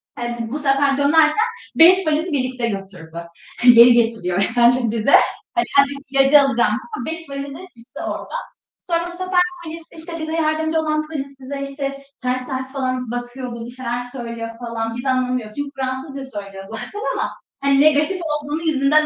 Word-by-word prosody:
He, -, -, -8 dB, 0.2 s
b 230 Hz, -, -3 dB
bu 295 Hz, -, -3 dB
sefer 275 Hz, -1 st, +2 dB
dönerken 310 Hz, +9 st, +4 dB, 0.3 s
5 360 Hz, +2 st, +7 dB
valiz 310 Hz, +1 st, +1 dB
birlikte 255 Hz, -7 st, -1 dB
götürdü. 185 Hz, -5 st, -7 dB, 0.4 s
Geri 240 Hz, 0 st, +9 dB
getiriyor, 220 Hz, -5 st, +1 dB
yani 240 Hz, -1 st, +4 dB
bize. 225 Hz, +4 st, +4 dB, 0.4 s
Hani, 355 Hz, -, +1 dB
kendim 280 Hz, 0 st, +4 dB
ilacı 275 Hz, +2 st, +6 dB
alacağım 265 Hz, -4 st, +2 dB, 0.2 s
ama -, -, -5 dB
5 325 Hz, -1 st, -6 dB
valizle 275 Hz, +1 st, -6 dB
çıktı 265 Hz, -11 st, -11 dB
oradan. -, -, -4 dB, 0.4 s
Sonra, 340 Hz, -2 st, 0 dB
işte, 345 Hz, +1 st, -4 dB
bu 350 Hz, -, -11 dB
sefer 370 Hz, 0 st, +1 dB, 0.2 s
polis, 330 Hz, 0 st, -7 dB, 0.4 s
bize 315 Hz, 0 st, -4 dB
yardımcı 315 Hz, 0 st, +1 dB
olan 305 Hz, -1 st, -1 dB
polis 275 Hz, -3 st, -6 dB
bize, 275 Hz, +1 st, -6 dB
işte, 275 Hz, +1 st, -6 dB
bize 275 Hz, 0 st, -4 dB, 0.2 s
ters 255 Hz, 0 st, -2 dB
ters 260 Hz, 0 st, -4 dB
falan 255 Hz, -3 st, -2 dB
bakıyor, 245 Hz, +1 st, -5 dB
böyle, 235 Hz, -1 st, -7 dB
bir 240 Hz, -, -8 dB
şeyler 245 Hz, -1 st, -4 dB
söylüyor 235 Hz, -2 st, -6 dB
falan 230 Hz, -1 st, -4 dB
biz 245 Hz, -, -5 dB
de 270 Hz, -, -1 dB
anlamıyoruz. 250 Hz, -4 st, -1 dB
Çünkü 285 Hz, 0 st, -3 dB
Fransızca 265 Hz, -1 st, -4 dB
söylüyor 195 Hz, -1 st, -10 dB
zaten 240 Hz, -, -7 dB
ama -, -, -1 dB, 0.3 s
hani 275 Hz, 0 st, +4 dB
negatif 310 Hz, +5 st, +3 dB
olduğunu 300 Hz, 0 st, -2 dB
yüzünden 305 Hz, -1 st, +3 dB
275 Hz, 175 wpm, -20 LUFS, 240-305 Hz, 0.4 s, Geri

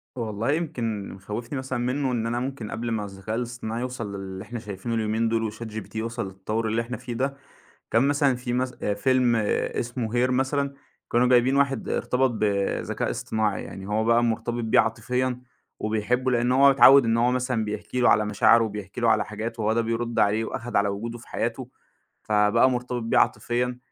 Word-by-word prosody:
والله، 115 Hz, +1 st, -2 dB
يمكن 120 Hz, -10 st, -2 dB
اللي -, -, -8 dB
مخوّفني 110 Hz, +8 st, -5 dB
مثلًا 130 Hz, -1 st, -3 dB
مِنُّه 130 Hz, +2 st, 0 dB
إن 115 Hz, -2 st, -1 dB
أنا 120 Hz, +1 st, -1 dB
ممكن 130 Hz, -4 st, -5 dB
قبل 120 Hz, 0 st, -3 dB
ما 105 Hz, -2 st, -1 dB
الذكاء 100 Hz, +2 st, -6 dB
الاصطناعي 120 Hz, -1 st, -4 dB
يوصل 115 Hz, -5 st, -4 dB
للي 95 Hz, 0 st, -7 dB
إحنا 120 Hz, +2 st, -6 dB
شايفينُه 105 Hz, +2 st, -5 dB
اليومين 110 Hz, +1 st, 0 dB
دول 110 Hz, -1 st, 0 dB
وChatGpt 110 Hz, -1 st, -8 dB
يوصل 115 Hz, 0 st, -3 dB
للتطوّر 105 Hz, +4 st, -3 dB
اللي 115 Hz, +2 st, 0 dB
إحنا 125 Hz, +2 st, -5 dB
فيه 120 Hz, -, -7 dB
ده، 135 Hz, +3 st, -2 dB, 0.5 s
كان 115 Hz, -, +4 dB
مثلًا 140 Hz, -3 st, +2 dB
في 125 Hz, -1 st, -4 dB
مث 125 Hz, +1 st, 0 dB
آآ، 105 Hz, -, 0 dB
فيلم 125 Hz, +2 st, +2 dB
اسمه 115 Hz, +2 st, -1 dB
Her -, -, -3 dB
مثلًا، 140 Hz, +2 st, 0 dB, 0.4 s
كانوا 120 Hz, +1 st, +4 dB
جايبين 125 Hz, +2 st, +4 dB
واحد 135 Hz, -4 st, +1 dB
ارتبط 130 Hz, 0 st, +1 dB
بذكاء 100 Hz, -3 st, -1 dB
اصطناعي، 110 Hz, -2 st, -1 dB
يعني 95 Hz, 0 st, -8 dB
هو 110 Hz, +1 st, 0 dB
بقى 115 Hz, +1 st, +4 dB
مرتبط 120 Hz, +1 st, -1 dB
بيه 110 Hz, -, +5 dB
عاطفيًا 125 Hz, +3 st, -1 dB, 0.4 s
وبيحبه 115 Hz, +4 st, 0 dB
لأن 120 Hz, +1 st, +2 dB
هو 140 Hz, +1 st, +6 dB
اتعوّد 135 Hz, -1 st, +8 dB
إن 115 Hz, 0 st, +2 dB
هو 120 Hz, +2 st, +3 dB
مثلًا 125 Hz, -3 st, 0 dB
بيحكي 105 Hz, +4 st, -4 dB
له 120 Hz, -, +5 dB
على 105 Hz, -, +4 dB
مشاعرُه 110 Hz, +2 st, +4 dB
وبيحكي 105 Hz, 0 st, -6 dB
له 120 Hz, -, +2 dB
على 110 Hz, -2 st, +3 dB
حاجات 110 Hz, +2 st, -5 dB
وهو 110 Hz, +1 st, +1 dB
ده 115 Hz, -, +2 dB
بيرد 115 Hz, +1 st, -2 dB
عليه 105 Hz, +2 st, +3 dB
وأخد 120 Hz, +1 st, -4 dB
على 100 Hz, 0 st, +3 dB
وجودُه 115 Hz, +4 st, -4 dB
في 115 Hz, -, -16 dB
حياته. 120 Hz, +2 st, -3 dB, 0.5 s
فبقى 105 Hz, +4 st, +3 dB
مرتبط 125 Hz, -1 st, -2 dB
بيه 115 Hz, -, +2 dB
عاطفيًا 125 Hz, +1 st, +1 dB
115 Hz, 190 wpm, -25 LUFS, 110-125 Hz, 0.5 s, اتعوّد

